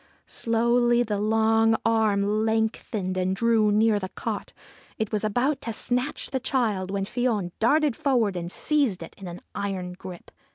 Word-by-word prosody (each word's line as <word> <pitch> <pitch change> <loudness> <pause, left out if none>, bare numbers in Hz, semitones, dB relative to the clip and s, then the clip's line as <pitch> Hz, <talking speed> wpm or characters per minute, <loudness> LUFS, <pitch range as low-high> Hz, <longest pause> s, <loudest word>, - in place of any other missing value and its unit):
Slowly 240 +1 +2
the 210 -3 -2
long 225 +1 +3
arm 215 -2 +2
lengthened 220 -3 -1
and 185 +1 0
drew 225 -1 +3
near 215 0 +3
the 185 -1 -5
cot. - - -5 0.5
It 220 -2 -2
was 215 -1 -1
about 245 +7 0
to 230 - -4
snatch 250 +5 -2
the 265 - 0
child, 215 -8 -1
when 195 0 -2
Fion 215 -5 -1
darted 290 +3 +3
forward 235 -8 +1
and 175 0 -4
seized 275 - 0
it 165 - -11
in 195 - -8
an 175 0 -8
iron 190 -2 -3
grip. 180 -1 -10
220 Hz, 160 wpm, -25 LUFS, 195-235 Hz, 0.5 s, long